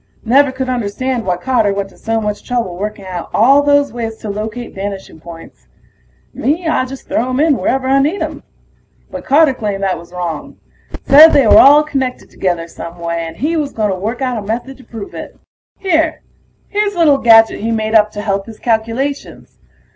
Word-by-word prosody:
Never 270 +4 +4
could 260 0 -4
understand 245 0 -3
why 180 -1 0
Carter 220 0 +1
went 195 0 -3
to - - -21
so 225 0 -1
much 210 -1 -4
trouble 235 -8 -3
working 205 +1 -5
out 180 -2 -6
all 270 +6 +5
those 285 -1 +2
ways 225 -2 -5
to 210 - -6
locate 220 +4 -6
vanishing 195 -3 -7
points. 165 0 -13 0.7
Me, 320 +7 -1
I 290 -5 +1
just 265 +1 -10
throw 245 +3 -1
'em 255 +1 -1
in 305 -1 +3
wherever 260 0 -1
I 270 +1 +3
need 305 +8 0
'em. - - -6 0.7
But - - -8
Carter 290 0 +4
claimed 205 -5 -4
that 190 -1 -1
was 170 +1 -15
wrong. 175 -3 -5 0.5
Said 305 +4 +8
they 280 - +4
were - - +7
all 290 +2 +7
connected 265 -4 -4
together 175 -3 -2
some 170 +1 -9
way, 170 -1 -3
and 165 0 -10
he 310 +5 -1
was 295 -3 -2
gonna 210 -3 -1
work 220 +8 -4
out 250 -3 -1
a - - -6
method 235 +6 -5
to 260 - -16
prove 225 -5 -9
it. - - -9 0.4
Here... 325 -4 0 0.5
here's 410 -1 -1
a - - -9
little 300 -5 +4
gadget 225 -2 +5
he 225 - -3
made 220 -1 -2
up 215 -1 +5
to 205 - -5
help 195 0 -2
his 225 - -10
calculations. 235 +5 -3
230 Hz, 200 wpm, -15 LUFS, 200-275 Hz, 0.7 s, Said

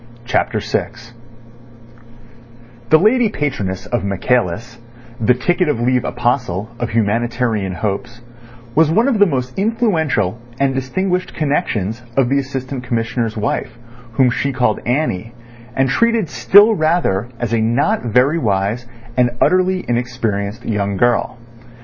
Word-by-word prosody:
CHAPTER 125 - 0
VI - - -1 2.0
The 155 - +7
lady 220 +6 +3
patroness 105 - -3
of 120 -4 -2
Michaelis, 115 +3 -1 0.4
the 120 +2 +3
ticket 175 +6 +1
of 130 - 0
leave 125 +1 +1
apostle 120 -4 -1
of 120 - -2
humanitarian 115 -2 0
hopes, 115 +5 -4 0.5
was 160 +2 +4
one 225 +10 +3
of 240 -6 +1
the 205 - +6
most 125 -1 -3
influential 165 - 0 0.2
and 135 -1 +2
distinguished 180 +8 -2
connections 120 - -1 0.2
of 130 -3 +3
the 140 +1 +2
Assistant 130 -1 -5
Commissioner's 115 -1 -2
wife, 115 +2 -2 0.4
whom 125 +1 +3
she 140 +3 -1
called 125 -4 +1
Annie, 120 -5 -1 0.4
and 135 0 +2
treated 230 - +1
still 205 - +6
rather 155 - +1
as 120 -2 -2
a 115 - +2
not 140 - +1
very 125 +7 +2
wise 105 0 -1 0.3
and 125 -1 +3
utterly 185 0 +2
inexperienced 120 -3 -2
young 100 -2 -1
girl. 120 +1 +1
125 Hz, 130 wpm, -18 LUFS, 115-155 Hz, 2.0 s, The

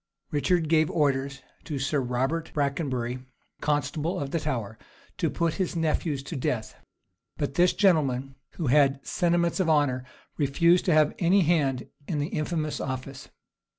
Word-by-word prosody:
Richard 160 +3 +1
gave 155 0 +3
orders 140 -2 0 0.2
to 150 - -4
Sir 135 +2 0
Robert 130 +6 -1
Brakenbury, 135 -4 -1 0.4
constable 150 +3 -1
of 140 -1 -4
the 165 - 0
Tower, 115 -8 -3 0.4
to - - +1
put 170 -2 0
his 180 - -1
nephews 155 -3 0
to 160 - -6
death; 120 -4 -2 0.6
but 145 -2 -2
this 175 +4 +4
gentleman, 135 -9 +2 0.2
who 165 - -4
had 135 0 +3
sentiments 170 +1 +1
of 180 -3 +2
honor, 145 -5 +2 0.3
refused 170 +5 +3
to 180 - +3
have 155 -1 +4
any 185 +3 +4
hand 145 -7 +1 0.2
in 160 - -2
the 145 +1 -1
infamous 155 -1 -2
office. 130 +1 -5
150 Hz, 150 wpm, -27 LUFS, 135-165 Hz, 0.6 s, this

